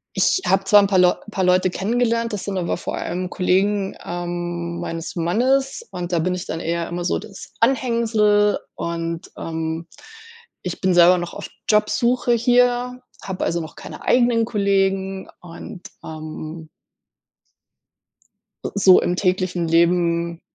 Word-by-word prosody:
ich 375 - +2
habe 190 0 +3
zwar 205 +1 +6
'n 200 - +2
paar 190 -2 +2
Leu 180 0 +5 0.2
paar 190 - -1
Leute 185 0 +3
kennengelernt. 230 +4 0
Das 205 - -4
sind 200 -1 -3
aber 175 -2 -1
vor - - -5
allem 180 +1 -3
Kollegen, 195 +2 +1
ähm, 175 0 -4
meines 165 +1 -5
Mannes 260 - 0
und 175 0 -5
da 170 - +1
bin 180 +3 0
ich 180 - -6
dann 165 - -4
eher 170 0 -2
immer 175 0 -4
so - - 0
das 200 -3 -11
Anhängsel 225 -4 +2 0.2
und, 165 0 -4
ähm, 160 0 -4 0.7
ich 180 - -5
bin 185 -1 +2
selber 175 +1 +6
noch 175 -1 -5
auf - - -7 0.2
Jobsuche 235 +3 +2
hier, 245 +1 +2 0.2
habe 190 -1 -3
also 170 0 -1
noch 155 - -9
keine - - -10
eigenen 240 -2 +3
Kollegen 195 -3 0
und, 175 +1 -10 0.2
ähm 155 0 -8 2.0
äh, - - -2
so 190 -2 +6
im 175 - 0
täglichen 185 -2 0
Leben 170 0 +2
185 Hz, 145 wpm, -21 LUFS, 170-210 Hz, 2.0 s, zwar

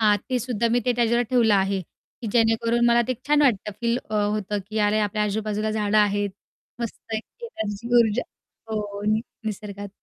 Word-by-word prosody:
हां, 210 -2 +5
तेसुद्धा 245 -2 0
मी 245 - +3
ते 245 - +4
त्याच्यावर 235 0 +3
ठेवलं 235 -4 +4
आहे, 195 0 +1
की 225 - -13
जेणेकरून 230 +1 +3
मला 235 0 +5
ते 255 - +1
छान 295 0 +5
वाटतं. 210 -6 +2
फील 235 0 +1
अ, 215 - -2
होतं, 210 0 0
की 215 +1 -3
अरे! 210 +1 +3
आपल्या 210 0 0
आजूबाजूला 215 +1 -1
झाडं 215 -1 +1
आहेत, 205 -1 +2 0.5
मस्त 235 -2 -4
आहे 220 - +1
एक 465 - -13
एनर्जी 210 +1 -4
ऊर्जा. 225 +1 +2 0.5
हो, 205 -2 -3
निसर्गात. 210 -2 -5
215 Hz, 175 wpm, -24 LUFS, 205-235 Hz, 0.5 s, हां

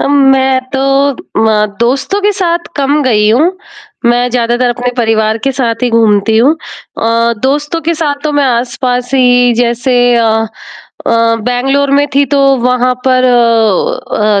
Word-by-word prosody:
अम, 280 - 0 0.2
मैं 265 0 +1
तो 265 - -1 0.3
अ, 220 -3 -1
दोस्तों 270 +11 0
के 415 - +2
साथ 345 -3 -1 0.2
कम 285 +2 0
गई 215 -5 +2
हूँ, 310 +10 +2 0.5
मैं 240 +1 +2
ज़्यादातर 240 +1 0
अपने 245 +1 -3
परिवार 220 -2 0
के 275 - +1
साथ 240 -2 -2
ही 250 - +2
घूमती 220 -1 +2
हूँ। 250 +7 +4 0.5
अ, 230 +1 +1
दोस्तों 295 +4 -1
के 330 +2 -1
साथ 300 -2 -1
तो 305 - -1
मैं 290 -1 +1
आस-पास 245 0 -2
ही 245 -1 +3
जैसे 245 +2 0 0.2
अ 230 -1 +2 0.8
अ, - - +1 0.3
बैंगलोर 270 +3 0
में 285 +1 +2
थी 280 +1 +3
तो 285 +2 0 0.2
वहाँ 250 0 0
पर 255 -1 +2
अ 225 -3 +1
250 Hz, 155 wpm, -11 LUFS, 230-275 Hz, 0.8 s, हूँ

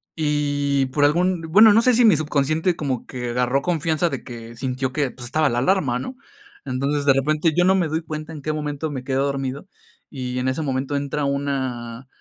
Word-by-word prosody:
y 145 -3 0
por 145 +3 +2
algún 175 +4 +2
bueno, 205 +7 +6
no 225 - +5
sé 250 +1 +4
si 240 +1 +4
mi 210 -8 +6
subconsciente 155 +3 0
como 135 -6 -3
que 125 -2 -5
agarró 125 +3 +1
confianza 165 0 0
de - - -5
que 115 -2 -9
sintió 130 +1 -3
que, 140 -1 -1
pues, 120 - -10
estaba 155 +5 +1
la 120 - 0
alarma, 135 -4 +1
¿no? 255 - -6 0.5
Entonces, 140 +2 -1
de 140 - +6
repente, 155 +4 +1
yo 175 - +4
no 190 +1 +4
me 180 -4 +1
doy 160 +2 -2
cuenta 155 0 -7
en 150 - -8
qué 155 - -2
momento 150 0 -3
me 130 -3 -5
quedo 135 0 0
dormido, 140 +3 -3 0.4
y 125 -3 -4
en 125 - -1
ese 130 +5 -2
momento 135 -1 -2
entra 140 +1 -2
una 130 -3 -3
145 Hz, 205 wpm, -22 LUFS, 130-155 Hz, 0.5 s, bueno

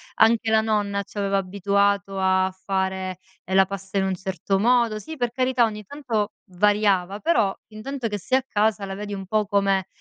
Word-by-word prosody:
anche 225 0 +4
la 220 - +5
nonna 205 -2 0
ci 205 - -15
aveva 200 -1 +1
abituato 200 +1 0
a 190 0 +2 0.2
fare, 190 -1 -1 0.3
ehm, 190 - -6
la 195 - +6
pasta 195 0 -6
in 190 - +2
un 190 - 0
certo 190 +1 -2
modo 235 0 +3
sì, 315 +7 -8
per 245 -2 -1
carità, 255 -1 +2
ogni 210 -1 -5
tanto 225 -4 -2 0.2
variava, 200 0 +2
però 215 -11 +2 0.2
intanto 250 +3 -4
che 210 -1 -3
sei 255 +7 +1
a - - -10
casa 210 -2 +1
la 195 - -5
vedi 205 +1 -6
un 195 -1 -5
po' 215 +2 +1
come: 195 -2 +1
200 Hz, 190 wpm, -24 LUFS, 195-220 Hz, 0.3 s, la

